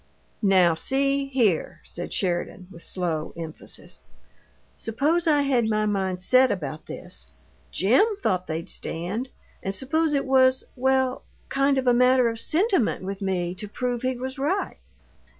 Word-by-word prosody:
"Now, 190 -5 +5
see 275 +9 +1
here," 235 -11 +1
said 175 - -6
Sheridan, 180 0 -2
with 170 - -12
slow 165 -4 -3
emphasis; 160 -2 -4 0.7
"suppose 305 +10 0
I 295 -2 +4
had 250 -5 +2
my 215 0 +1
mind 190 -3 -1
set 255 +5 +5
about 155 -4 -4
this. 60 0 -7 0.4
JIM 265 - +3
thought 185 0 0
they'd 160 +1 -4
stand, 195 +10 -4 0.3
and 195 +1 -2
suppose 300 +6 0
it 275 - 0
was 260 -1 +4
well, 260 0 +1 0.3
kind 275 0 +2
of 265 - 0
a 245 - +5
matter 250 0 +4
of 225 - -5
sentiment 345 - +1
with 195 +1 -5
me 180 -3 -1
to 210 +3 -6
prove 245 +3 -3
he 255 0 -1
was 260 +2 -5
right." 350 +9 -1
240 Hz, 150 wpm, -25 LUFS, 185-270 Hz, 0.7 s, Now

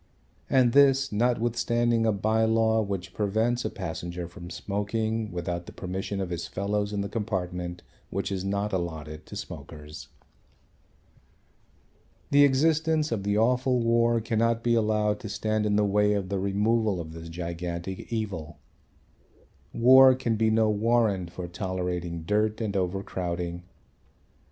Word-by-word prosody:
And 125 -3 +4
this, 135 -1 +5
notwithstanding 120 0 +1
a - - +4
bye 110 +2 +1
law 110 0 +3
which 95 -3 -4
prevents 110 +4 0
a 110 - -1
passenger 85 -2 -5
from 85 0 -10
smoking 105 +4 -2
without 85 0 -4
the - - -8
permission 95 +2 -4
of 95 -2 -3
his 85 -1 -3
fellows 100 +1 -2
in 100 -1 -1
the 100 - -2
compartment 90 -5 -3 0.3
which 100 +2 -3
is 95 -1 -2
not 100 +1 -1
allotted 80 -4 -4
to - - -9
smokers. 75 +1 -9 2.2
The 145 0 +7
existence 155 +2 +2
of 110 -4 -1
the 100 +1 0
awful 125 +3 +2
war 115 0 +3
cannot 115 +1 0
be 120 - +2
allowed 105 -2 +1
to 105 - -7
stand 110 +1 -1
in 105 - +1
the 105 0 +3
way 105 +1 +3
of 100 -3 -2
the 100 -1 -1
removal 105 +1 +1
of 80 -1 -7
this 80 0 -9
gigantic 85 +3 -5
evil. 95 -9 -4 1.1
War 130 +2 +7
can 120 -3 -1
be 110 0 +2
no 110 0 +3
warrant 105 -4 +1
for 90 0 -6
tolerating 90 -2 -3
dirt 105 +4 0
and 105 -3 -2
overcrowding. 90 -2 -2
105 Hz, 140 wpm, -27 LUFS, 90-115 Hz, 2.2 s, The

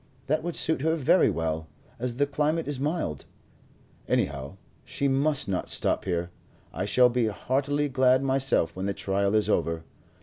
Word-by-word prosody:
That 150 +4 0
would 170 +1 -4
suit 160 -4 -1
her 160 +2 +2
very 160 +4 +4
well, 80 -1 -2 0.3
as 120 0 -2
the 145 +3 +2
climate 150 +3 -1
is 145 -3 -3
mild. 145 - -2 0.8
Anyhow, 70 +5 -1 0.3
she 140 - -2
must 140 +1 +2
not 95 -2 -2
stop - - 0
here. 85 -1 -2 0.4
I - - -2
shall 125 -1 +5
be 120 -2 +1
heartily 140 +7 -1
glad 130 -1 +3
myself 130 -11 +1
when 95 +1 -3
the 100 - -2
trial 100 +1 0
is 105 - +2
over. 85 -1 0
130 Hz, 165 wpm, -27 LUFS, 95-145 Hz, 0.8 s, shall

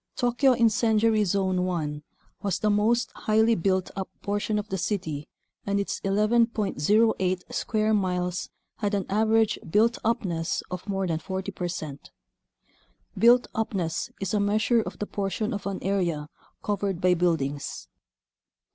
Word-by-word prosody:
Tokyo 250 +2 +3
Incendiary 225 -2 +3
Zone 190 -1 +1
1 155 -5 -2 0.4
was 200 -2 0
the 215 - +1
most 225 +4 +2
highly 220 +1 +2
built 185 -1 0
up 190 -1 -4
portion 205 +1 -1
of 210 0 -3
the 190 - -2
city 170 -6 -2 0.4
and 200 0 0
its 200 - -2
11.08 210 -3 +1
square 215 0 0
miles 180 -3 -1 0.3
had 205 -1 -1
an 195 - -1
average 220 +1 +2
built 225 +6 +3
upness 190 -7 -1
of 180 +3 -6
more 195 -1 0
than 165 -3 -1
40 190 +3 -4
percent. 165 -5 -5 1.1
(Built 240 +2 +5
upness 185 -7 -2
is 195 0 -3
a 210 - +2
measure 215 +3 +2
of - - -7
the 210 - -3
portion 205 +3 -2
of 200 0 -4
an 195 -1 -2
area 170 -6 -1 0.3
covered 200 -3 -1
by 180 0 +4
buildings.) 160 -5 -1
200 Hz, 140 wpm, -26 LUFS, 180-220 Hz, 1.1 s, Built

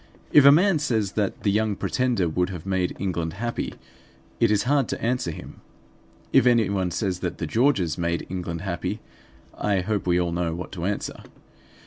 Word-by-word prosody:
If 145 -2 +7
a 140 - +10
man 175 +2 +4
says 110 -9 0
that 100 -2 -2
the 100 - +2
Young 105 0 +1
Pretender 120 -5 0
would 90 +3 0
have 90 -3 -7
made 95 -2 -1
England 85 -4 -2
happy, 120 +5 -4 0.6
it 115 - +4
is 105 -1 +2
hard 140 -1 +2
to - - -4
answer 120 -5 -1
him. 80 - -9 0.7
If 125 - +5
anyone 100 -6 +2
says 95 0 -2
that 90 -1 -3
the 85 - -3
Georges 95 - +1
made 85 0 -1
England 85 -3 -4
happy, 90 -4 -3 0.6
I 100 -3 0
hope 100 0 -2
we 90 0 +3
all 85 -1 0
know 85 -1 -1
what 90 - -7
to 90 -2 -5
answer. 105 +1 -3
95 Hz, 180 wpm, -24 LUFS, 90-115 Hz, 0.7 s, a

